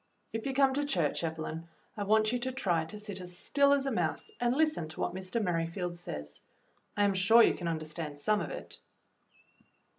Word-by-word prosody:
"If 225 +3 -3
you 270 - -2
come 270 -1 +4
to 290 +2 0
church, 175 - 0
Evelyn, 160 0 -4 0.3
I 205 -2 -3
want 215 +1 +4
you 245 - 0
to 260 +2 -2
try 175 -11 0
to 185 +6 -5
sit 205 -3 -5
as 180 0 -8
still 280 +8 +3
as 280 -1 +3
a 275 - 0
mouse 430 - -1
and 240 +1 +2
listen 310 - +1
to 155 - -10
what - - -1
Mr. 190 +5 -2
Merrifield 175 -2 -1
says. 75 - -6 0.6
I 205 - +4
am 200 -1 +3
sure 200 +5 +6
you - - +5
can 175 - -5
understand 155 -2 -3
some 210 +8 +1
of - - -4
it." - - -8
190 Hz, 205 wpm, -31 LUFS, 165-240 Hz, 0.6 s, sure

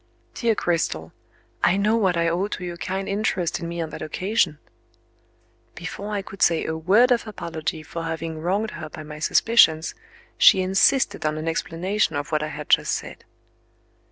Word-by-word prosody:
"Dear 230 -2 +1
Cristel, 85 - -1 0.5
I 180 +3 +4
know 210 +3 +2
what 190 -6 +2
I 170 0 +2
owe 175 +4 0
to 185 -3 -5
your 175 -1 -5
kind 190 +2 -3
interest 195 -4 -1
in 170 - -5
me 170 0 -5
on 160 -1 -4
that - - -8
occasion!" 185 -1 0 1.2
Before 200 +4 -6
I 205 -2 -2
could 195 0 -11
say 165 -1 +3
a 160 - -2
word 200 +10 +4
of 235 -2 +2
apology 165 -5 -5
for 170 - -6
having 160 0 -4
wronged 195 +7 -1
her 155 -2 -7
by 155 - -9
my 150 0 -9
suspicions, 160 -2 +4 0.5
she 190 - +7
insisted 195 +8 +2
on 155 0 0
an 155 +1 -4
explanation 175 +5 -1
of 145 +3 -4
what 155 -1 +1
I 155 - -2
had - - -7
just - - +3
said. - - -6
175 Hz, 180 wpm, -23 LUFS, 160-200 Hz, 1.2 s, she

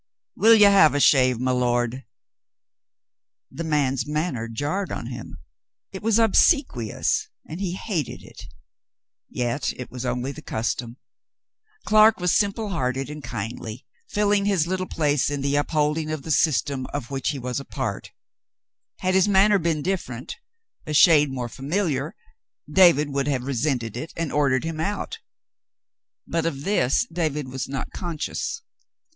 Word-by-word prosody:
"Will 225 +1 +6
you 210 -2 +7
have 195 -8 +6
a - - +2
shave, 130 -4 +4
my 130 +1 0
lord 120 0 0 0.7
?" - - -68 0.7
The 165 - -5
man's 140 -5 0
manner 150 -6 -2
jarred 145 - -3
on 120 - -5
him. 120 - -8 0.5
It 190 - -7
was 225 0 +2
obsequious, 225 - +2 0.2
and 165 +5 -7
he 180 -3 -2
hated 185 - -4
it. - - -12 0.8
Yet 120 +3 -2
it 125 - -9
was 125 0 -6
only 125 +1 -2
the 140 - -10
custom. 115 +2 -3 0.9
Clark 215 0 +5
was 180 -1 +1
simple 205 +1 0
hearted 135 -5 -2
and 150 -1 -8
kindly, 115 +1 -6 0.2
filling 205 -1 +1
his 195 -6 +2
little 185 +1 -2
place 150 -3 +1
in 145 -1 -3
the 140 +1 0
upholding 150 +1 0
of 155 -3 -4
the 160 - -4
system 140 -3 +1
of 140 -3 -6
which 135 -2 -1
he 145 - -2
was 125 0 -3
a - - -7
part; - - -4 0.9
had 185 0 +1
his 190 +1 +4
manner 200 +1 +4
been 160 -3 -1
different, 135 -10 -4 0.5
a 155 - -2
shade 150 -2 +6
more 125 -2 -3
familiar, 150 - -2 0.5
David 150 -3 +5
would 140 0 -1
have 135 -4 -1
resented 125 -4 -2
it 125 +7 -6
and 165 -3 -2
ordered 135 -3 +2
him 165 -1 -4
out, 200 +6 -3 0.5
— - - -68
but 165 0 -1
of 140 -4 -4
this 170 - +2
David 150 -5 -2
was 130 0 -5
not 135 -1 -4
conscious. 175 - -4
150 Hz, 155 wpm, -24 LUFS, 130-180 Hz, 0.9 s, you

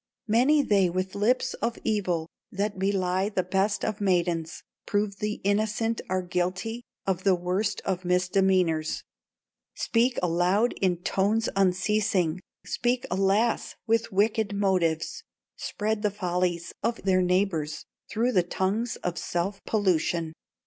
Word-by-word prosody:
Many 260 +7 +4
they 195 -6 +3
with 185 +2 -2
lips 220 +5 +1
of 230 0 -1
evil, 180 -7 0 0.2
That 200 0 -2
belie 190 0 +1
the 195 -3 0
best 195 +3 0
of 215 -1 -3
maidens, 175 -4 0 0.2
Prove 205 -1 0
the 210 +1 -1
innocent 215 +3 0
are 185 0 0
guilty 185 +6 -2 0.2
Of 190 -1 -1
the 195 -2 +4
worst 180 +4 -1
of 185 -1 -1
misdemeanors, 180 -3 +1 0.7
Speak 240 +2 +1
aloud 180 +7 +2
in 180 -2 +1
tones 210 +3 +1
unceasing, 190 -2 +1 0.2
Speak, 245 +1 0
alas! 195 +5 +1
with 230 0 +1
wicked 205 +1 +1
motives, 180 -5 0 0.3
Spread 215 0 -2
the 210 - +2
follies 180 -3 -1
of 235 0 -2
their 185 -1 +3
neighbors 180 -4 0 0.2
Through 235 +3 +1
the 190 -7 +4
tongues 195 +6 -1
of 175 -1 -2
self 190 +4 -2
pollution. 170 -5 +1
195 Hz, 130 wpm, -27 LUFS, 180-215 Hz, 0.7 s, Many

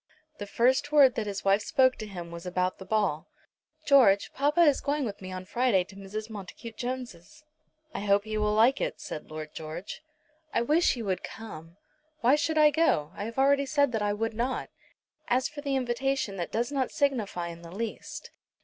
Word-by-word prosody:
The 205 - -5
first 260 +7 +2
word 280 -4 +7
that 220 -2 -3
his 200 -1 -5
wife 195 +2 +4
spoke 260 +3 +3
to 215 - -6
him 175 -4 -8
was 170 +1 -8
about 180 0 -1
the 190 - -9
ball. 190 -7 0 0.6
"George, 230 -9 +5
papa 295 +5 +2
is 295 -5 +5
going 285 -1 -1
with 205 -4 -6
me 185 0 -7
on 185 0 -6
Friday 235 -2 +2
to 190 - -16
Mrs. 200 +2 -6
Montacute 220 +2 -9
Jones'." 250 - -6 0.5
"I - - -3
hope 200 0 +2
he 215 0 -5
will 210 0 +1
like 240 +5 +4
it," - - -2
said 155 - -7
Lord 155 0 -7
George. 160 +4 -7 0.5
"I 235 - +3
wish 310 +6 +3
you 235 -3 -5
would 190 -2 -1
come." 170 -6 -9 0.4
"Why 245 +3 +5
should 315 +1 -1
I 300 -1 +6
go? 285 - +2
I 205 - -4
have 230 +2 -7
already 280 +1 +3
said 285 -2 +2
that 220 -2 -1
I 205 0 +1
would 225 +2 -2
not." 245 +4 -2 0.6
"As 250 +1 +2
for 295 -1 -9
the 280 -2 -1
invitation 260 -3 -1
that 175 - -4
does 240 +4 -1
not 270 -3 0
signify 215 -11 -1
in 170 0 -9
the 170 - -11
least. 230 - -6
225 Hz, 200 wpm, -28 LUFS, 195-270 Hz, 0.6 s, word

